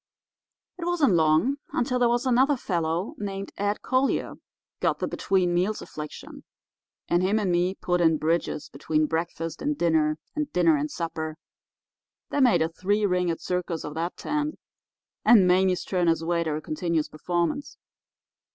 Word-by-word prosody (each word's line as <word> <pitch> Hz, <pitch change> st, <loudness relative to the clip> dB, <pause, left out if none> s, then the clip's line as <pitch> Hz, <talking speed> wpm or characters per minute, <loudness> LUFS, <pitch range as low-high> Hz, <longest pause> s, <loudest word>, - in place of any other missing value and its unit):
"It 340 Hz, -, -4 dB
wasn't 335 Hz, -, +2 dB
long 160 Hz, -, +3 dB, 0.2 s
until 250 Hz, +1 st, 0 dB
there 240 Hz, -1 st, +4 dB
was 240 Hz, +2 st, +1 dB
another 260 Hz, +3 st, +3 dB
fellow 170 Hz, -3 st, -2 dB
named 195 Hz, -1 st, -5 dB
Ed 205 Hz, +1 st, -2 dB
Collier 260 Hz, +1 st, +1 dB, 0.5 s
got -, -, +1 dB
the -, -, -2 dB
between 185 Hz, -2 st, +1 dB
meals 185 Hz, +5 st, 0 dB
affliction, 150 Hz, 0 st, -9 dB, 0.6 s
and 175 Hz, -, +2 dB
him 195 Hz, +4 st, +2 dB
and 200 Hz, -4 st, 0 dB
me 175 Hz, +2 st, +1 dB
put 180 Hz, -2 st, 0 dB
in 160 Hz, -2 st, +4 dB
bridges 160 Hz, -1 st, -1 dB
between 155 Hz, -1 st, 0 dB
breakfast 165 Hz, 0 st, -3 dB
and 295 Hz, 0 st, -1 dB
dinner, 155 Hz, -2 st, +2 dB, 0.2 s
and 300 Hz, -1 st, -2 dB
dinner 170 Hz, -3 st, +4 dB
and 150 Hz, +1 st, -1 dB
supper, 160 Hz, -2 st, -4 dB, 0.9 s
that 285 Hz, -, +1 dB
made 220 Hz, -11 st, +5 dB
a 160 Hz, -, -1 dB
three 205 Hz, +5 st, 0 dB
ringed 180 Hz, -3 st, 0 dB
circus 180 Hz, -2 st, -2 dB
of 150 Hz, -, -6 dB
that 165 Hz, +3 st, -3 dB
tent, 300 Hz, 0 st, -2 dB, 0.7 s
and 205 Hz, -6 st, +6 dB
Mame's 185 Hz, 0 st, +3 dB
turn 180 Hz, -2 st, 0 dB
as 165 Hz, 0 st, +2 dB
waiter 170 Hz, -2 st, 0 dB
a 155 Hz, -, -5 dB
continuous 160 Hz, -1 st, -1 dB
performance. 175 Hz, -, -2 dB
175 Hz, 155 wpm, -26 LUFS, 165-210 Hz, 0.9 s, and